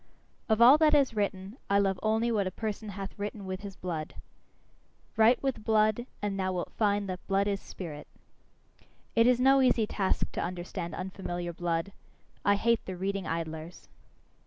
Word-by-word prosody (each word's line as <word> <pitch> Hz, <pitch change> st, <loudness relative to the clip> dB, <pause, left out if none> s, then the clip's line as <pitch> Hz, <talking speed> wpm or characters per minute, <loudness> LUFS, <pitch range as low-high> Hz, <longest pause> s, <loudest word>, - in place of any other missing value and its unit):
Of 220 Hz, +1 st, +5 dB
all 265 Hz, +6 st, +8 dB
that 305 Hz, -1 st, +5 dB
is 270 Hz, -5 st, +3 dB
written, 200 Hz, +1 st, -2 dB
I 200 Hz, -, +4 dB
love 195 Hz, -2 st, +1 dB
only 220 Hz, +2 st, +1 dB
what 205 Hz, -4 st, +1 dB
a -, -, 0 dB
person 215 Hz, +2 st, -5 dB
hath 195 Hz, 0 st, -6 dB
written 205 Hz, 0 st, -5 dB
with 185 Hz, 0 st, -5 dB
his 200 Hz, -2 st, -8 dB
blood. 165 Hz, -5 st, -5 dB, 1.0 s
Write 225 Hz, +4 st, +4 dB
with 270 Hz, -5 st, -1 dB
blood, 215 Hz, +2 st, +2 dB, 0.2 s
and 200 Hz, -1 st, -1 dB
thou 185 Hz, 0 st, 0 dB
wilt 180 Hz, -, -3 dB
find 205 Hz, -2 st, +1 dB
that 185 Hz, -1 st, -6 dB
blood 195 Hz, 0 st, +2 dB
is 200 Hz, -1 st, -1 dB
spirit. 155 Hz, -5 st, -8 dB, 1.1 s
It 230 Hz, +1 st, +5 dB
is 250 Hz, -1 st, +4 dB
no 270 Hz, +1 st, +5 dB
easy 245 Hz, -4 st, +3 dB
task 195 Hz, -2 st, -1 dB
to -, -, -3 dB
understand 175 Hz, -1 st, -4 dB
unfamiliar 175 Hz, -2 st, -5 dB
blood; 170 Hz, +2 st, -2 dB, 0.5 s
I 200 Hz, -, +4 dB
hate 230 Hz, +2 st, +1 dB
the 185 Hz, -1 st, -5 dB
reading 195 Hz, -1 st, -2 dB
idlers. 160 Hz, 0 st, -5 dB
200 Hz, 170 wpm, -29 LUFS, 185-220 Hz, 1.1 s, all